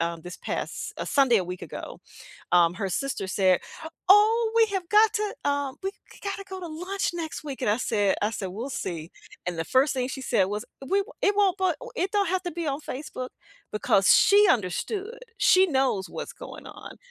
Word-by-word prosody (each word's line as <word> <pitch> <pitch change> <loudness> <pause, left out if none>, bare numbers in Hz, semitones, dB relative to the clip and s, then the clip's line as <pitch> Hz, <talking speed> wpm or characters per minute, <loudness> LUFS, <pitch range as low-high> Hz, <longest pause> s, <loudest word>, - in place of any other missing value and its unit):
um, 170 0 -2
this 180 +1 -8
past, - - -4
uh, - - -4
Sunday 270 -4 +4
a 190 - +1
week 180 0 -7
ago, 165 - -8 0.5
um, 175 -1 +5
her 195 0 -3
sister 200 +1 -2
said, 185 -2 +3 0.5
"Oh, 440 +3 +6
we 455 - +6
have 365 -3 -2
got 430 +2 +5
to, 420 -1 -1
um, 285 -2 -1
we 385 - -1
g - - -20
gotta 395 0 -3
go 380 - -6
to 355 - -6
lunch 365 +5 -2
next 320 -2 -5
week." 275 -3 -6
And 210 - +2
I 210 - +2
said 205 -5 +1
I 210 - +1
said, 205 -3 -4
"We'll 230 +9 -5
see." 165 -7 -5 0.4
And 180 -1 -2
the 165 - -1
first 260 - +3
thing 255 -1 -1
she 265 0 -6
said 225 -7 +2
was, 210 +3 -4 0.2
"We 395 +7 +2
won't - - -15
it 405 0 +3
won't, 395 -2 +3
but 370 -4 +1 0.2
it 375 +2 -1
don't 405 -3 +2
have 375 +1 0
to 350 - -2
be 335 0 -4
on 280 0 -1
Facebook." 255 -3 -6 0.4
Because 195 -2 +4
she 405 0 +6
understood. 395 - -2 0.2
She 370 +1 +6
knows 265 - 0
what's - - -6
going - - -10
on. - - -11
280 Hz, 210 wpm, -26 LUFS, -, 0.5 s, Oh